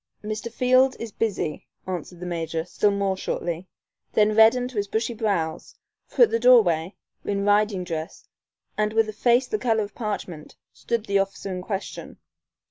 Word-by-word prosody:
"Mr. 215 +2 -4
Field 255 +2 +3
is 230 -2 -6
busy," 195 -10 -3 0.2
answered 180 -1 -6
the 180 - -6
major, 165 -2 -3
still 205 +3 +1
more 200 -1 0
shortly, 175 -1 -4 0.5
then 215 0 +3
reddened 230 +3 +5
to 240 - -9
his 205 0 0
bushy 225 +3 -1
brows, 195 -8 -2 0.3
for - - +4
at 465 - +4
the 230 - +1
doorway, 200 -8 +4 0.3
in 200 0 -1
riding 205 -2 +2
dress, 165 -2 -6 0.5
and 215 0 +1
with 225 0 +3
a 215 - -5
face 240 +4 +3
the 430 - -3
color 225 -3 +1
of 200 -1 -8
parchment, 200 -8 -5 0.2
stood 235 -2 -3
the 200 0 +2
officer 195 0 -3
in 180 - -4
question. 195 +1 -6
205 Hz, 170 wpm, -24 LUFS, 180-225 Hz, 0.5 s, reddened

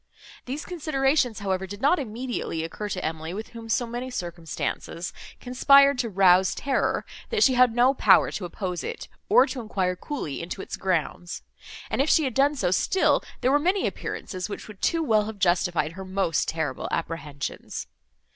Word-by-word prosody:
These 275 +5 -5
considerations, 275 - 0
however, 190 -1 -1
did 200 +2 -8
not 290 +8 +3
immediately 235 - -3
occur 205 +6 -5
to 185 -2 -3
Emily, 160 +2 -4
with 215 +2 -6
whom 230 -1 -10
so 240 +2 +1
many 240 +2 -5
circumstances 170 -3 -4 0.3
conspired 275 +2 +5
to 235 - 0
rouse 185 -1 +4
terror, 275 - 0 0.2
that 445 -2 +2
she 265 - +5
had 250 -2 +4
no 250 +2 +5
power - - +5
to 190 - -4
oppose 180 0 -4
it, - - -5 0.2
or 255 - +7
to 255 -2 -5
enquire 190 -5 -1
coolly 180 - -5
into 170 +3 -6
its - - -5
grounds; 175 -1 -2 0.4
and, - - 0
if 290 - +1
she 315 - +5
had 260 -4 -1
done 280 +3 +3
so, 185 -10 0
still 375 - +2 0.2
there 255 - +3
were 290 - +4
many 365 +6 +1
appearances 185 +1 -4
which - - -7
would 210 -3 -12
too 330 -1 +1
well 215 -7 +3
have 220 -1 -6
justified 175 -4 +1
her 190 +3 -8
most 185 -4 0
terrible 160 -5 -2
apprehensions. 150 -5 -4
215 Hz, 175 wpm, -26 LUFS, 180-265 Hz, 0.4 s, or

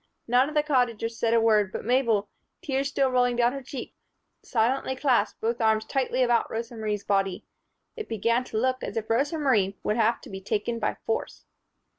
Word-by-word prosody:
None 250 +4 +3
of 305 - -9
the 300 - +3
Cottagers 235 -5 0
said 230 0 +2
a - - +5
word; 215 -3 +3
but - - -6
Mabel, 235 -4 +2 0.4
tears 275 -1 -1
still 270 -2 +1
rolling 245 -1 +2
down 240 +1 +2
her 275 - -5
cheeks, 260 -1 -8 0.5
silently 260 +3 0
clasped 250 -6 +1
both 230 +2 -1
arms 220 0 +2
tightly 260 -1 0
about 240 -1 +2
Rosa 230 +1 -5
Marie's 210 -2 -3
body. 195 -2 0 0.5
It 440 -3 -7
began 230 +3 +1
to 220 - -5
look 255 +3 0
as - - -4
if 220 0 -3
Rosa 285 +7 +1
Marie 210 -10 +1
would 210 - 0
have 230 +1 +2
to - - -12
be 190 0 -6
taken 215 +4 -2
by 210 - -1
force. 225 - -3
235 Hz, 195 wpm, -26 LUFS, 220-260 Hz, 0.5 s, a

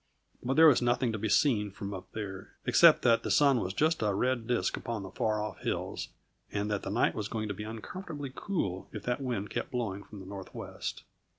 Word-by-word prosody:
But 130 +2 -1
there 160 +2 +8
was 145 -6 +7
nothing 120 0 +2
to 110 - -3
be 110 +1 -1
seen 105 -5 +3
from 100 +1 -6
up 95 - -8
there, 100 -3 -6
except - - +7
that 115 -1 +5
the - - -4
sun 140 -4 +5
was 90 - -2
just 155 - +1
a 105 -2 +1
red 120 +1 0
disk 120 -1 +1
upon 115 -4 -4
the 95 - -8
far 110 -1 0
off 105 0 -4
hills, - - -3 0.4
and 105 +1 -1
that 105 - 0
the - - -5
night 100 - +2
was 105 -2 -3
going 110 -1 -3
to - - -1
be 105 - -6
uncomfortably 140 - -6
cool 100 - -2
if 105 - -7
that 125 +3 -1
wind 115 -6 -2
kept - - -3
blowing 110 -6 -3
from 105 - -11
the 95 - -9
northwest. 95 0 -6
110 Hz, 220 wpm, -30 LUFS, 100-125 Hz, 0.4 s, there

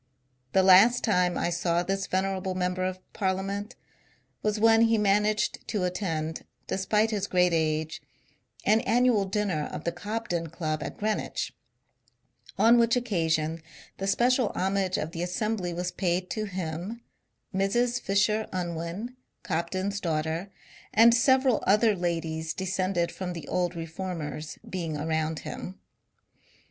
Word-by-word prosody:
The 190 - +5
last 195 +6 +7
time 180 -5 +2
I 175 - 0
saw 175 0 +1
this 195 +1 -2
venerable 190 0 -1
member 180 0 -1
of 185 0 -2 0.2
Parliament 200 +3 -2 0.7
was 210 0 0
when 225 +1 +5
he 230 0 +4
managed 210 +1 +1
to 210 -5 -1
attend, 165 -4 -2 0.2
de - - -2
spite 210 +3 +2
his 200 -2 -1
great 180 -1 +3
age, 155 0 0 0.6
an 220 +2 +4
annual 235 -3 +3
dinner 190 -6 -1
of - - -6
the 170 - 0
Cobden 175 -2 -3
Club 155 -1 -3
at - - -6
Greenwich; 215 0 -2 1.0
on 235 +1 +6
which 235 0 +4
occasion 165 -9 0 0.4
the 195 - -2
special 245 +4 +3
homage 190 0 0
of 155 - -3
the 170 - -5
assembly 180 +1 -1
was 180 +1 -3
paid 180 -1 -1
to 215 -1 -2
him, 180 +3 -5 0.5
Mrs. 240 +6 +1
Fisher 210 +2 +1
Unwin, 175 +6 -4 0.3
Cobden's 185 +5 -2
daughter, 160 +2 -2 0.4
and 230 +1 +7
several 260 0 +3
other 210 +2 +4
ladies 165 -2 -2
descended 185 -2 -1
from 180 -1 -5
the 170 - -8
old 180 -1 -1
reformers, 165 -2 -5
being 165 -5 -3
around 160 +1 -1
him. 185 +2 -7
185 Hz, 135 wpm, -27 LUFS, 170-210 Hz, 1.0 s, last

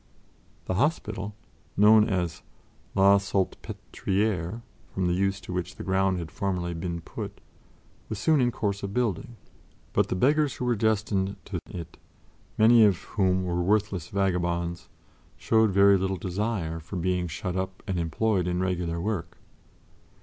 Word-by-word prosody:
The - - -1
hospital, 105 - -1 0.4
known 105 +2 +6
as 90 -4 -1 0.5
"La 100 +1 +6
Salpêtrière" 100 +1 -2 0.3
from 95 - -1
the 90 - +2
use 95 +2 0
to - - -7
which 90 -2 -3
the - - -7
ground 95 0 +1
had 85 -3 -6
formerly 90 -3 -2
been 85 0 -4
put, - - -7 0.7
was 110 - -3
soon 155 +5 +3
in 120 - +3
course 100 -4 -2
of 100 0 -5
building, 120 -2 -1 0.6
but - - +3
the - - 0
beggars 145 +6 +2
who 125 - -4
were 120 -1 +2
destined 105 -2 0
to 95 -4 -4
1711 90 - -5
it, 85 0 -13 0.6
many 115 +1 +7
of 100 -4 +5 0.2
whom 95 -2 +2
were 90 -1 -1
worthless 100 -2 +1
vagabonds, 85 -3 -1 0.5
showed 110 -1 +3
very 100 0 +5
little 95 0 -1
desire 90 -2 -2
for 85 +5 -9
being 90 0 0
shut 90 +3 -4
up 95 0 -4
and 95 -2 -2
employed 90 +3 0
in 90 0 0
regular 90 -2 -1
work. 100 -1 -3
95 Hz, 150 wpm, -27 LUFS, 90-105 Hz, 0.7 s, many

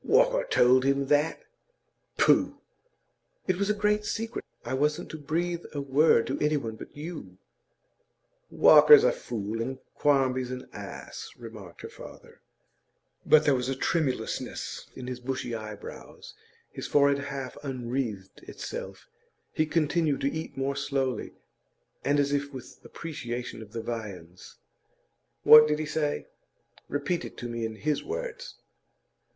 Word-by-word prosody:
'Walker - - +3
told 130 +1 +5
him 140 0 +2
that? 150 +2 +2 0.7
Pooh!' - - +4 0.9
'It 185 -1 +1
was 200 +1 0
a - - +4
great 210 0 +1
secret. 225 +2 -3 0.2
I 120 - -3
wasn't 150 +5 0
to 160 - -6
breathe 170 +3 -2
a 145 - -3
word 140 -2 +4
to 135 - -3
any 150 0 +2
one 115 -5 -4
but 110 - -12
you.' 165 +4 -7 1.1
'Walker's 450 -2 +8
a - - +5
fool 115 - -4
and 130 +3 -3 0.2
Quarmby's 130 -3 +2
an 130 0 -6
ass,' - - -8
remarked 110 -7 -11
her - - -5
father. - - -13 0.9
But 155 0 +6
there 145 - +5
was 125 0 -1
a 135 - -1
tremulousness 145 -1 -2
in 125 - -7
his 125 -1 -5
bushy 125 -1 -3
eyebrows; 110 -2 -8 0.4
his - - -6
forehead 140 -1 +4
half 135 -2 -5
unwreathed 120 -7 -4
itself; - - -7 0.5
he 155 - +1
continued 155 -2 +1
to 140 - +1
eat 160 -3 -6
more 135 +1 -1
slowly, 135 -5 -2 0.7
and 145 +1 +2
as 140 0 +2
if 140 0 -1
with 130 -3 -10
appreciation 125 -8 -6
of 105 -2 -11
the 115 0 -5
viands. 95 -7 -7 0.9
'What 150 0 +10
did 150 0 +1
he 155 - -3
say? 150 -1 -1 0.6
Repeat 145 +5 -1
it - - -9
to 120 - -5
me 115 -1 -3
in 110 - -8
his 150 +6 -1
words. - - -5
140 Hz, 145 wpm, -28 LUFS, 125-155 Hz, 1.1 s, What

